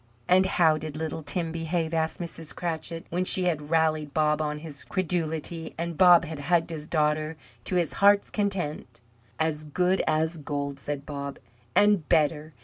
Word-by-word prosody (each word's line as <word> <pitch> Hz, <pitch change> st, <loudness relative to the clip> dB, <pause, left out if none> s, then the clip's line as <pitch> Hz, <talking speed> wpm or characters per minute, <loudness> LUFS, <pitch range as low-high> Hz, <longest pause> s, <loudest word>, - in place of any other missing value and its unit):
"And 185 Hz, +1 st, +5 dB
how 160 Hz, -4 st, +3 dB
did 155 Hz, -1 st, -6 dB
little 160 Hz, 0 st, -4 dB
Tim 160 Hz, +3 st, -3 dB
behave?" 165 Hz, 0 st, -2 dB
asked 160 Hz, 0 st, -1 dB
Mrs. 165 Hz, -2 st, -7 dB
Cratchit, 165 Hz, -1 st, -4 dB
when 180 Hz, +2 st, 0 dB
she 185 Hz, 0 st, +3 dB
had 155 Hz, -4 st, -1 dB
rallied 155 Hz, -2 st, +1 dB
Bob 150 Hz, 0 st, +2 dB
on 150 Hz, -1 st, -2 dB
his 150 Hz, -2 st, -8 dB
credulity, 165 Hz, -3 st, -2 dB
and 170 Hz, 0 st, -3 dB
Bob 175 Hz, +1 st, +7 dB
had 160 Hz, -2 st, -6 dB
hugged 165 Hz, +3 st, +1 dB
his 155 Hz, -2 st, -6 dB
daughter 155 Hz, 0 st, 0 dB, 0.3 s
to 185 Hz, -, -1 dB
his 175 Hz, -3 st, +1 dB
heart's 200 Hz, 0 st, +5 dB
content. 175 Hz, -, -2 dB, 0.4 s
"As 155 Hz, -1 st, 0 dB
good 180 Hz, +5 st, +1 dB
as 160 Hz, +2 st, +1 dB
gold," 140 Hz, -2 st, -4 dB
said 145 Hz, 0 st, -5 dB
Bob, 140 Hz, -2 st, -5 dB, 0.4 s
"and 205 Hz, -6 st, +4 dB
better. 155 Hz, 0 st, +2 dB
160 Hz, 165 wpm, -27 LUFS, 150-175 Hz, 0.4 s, Bob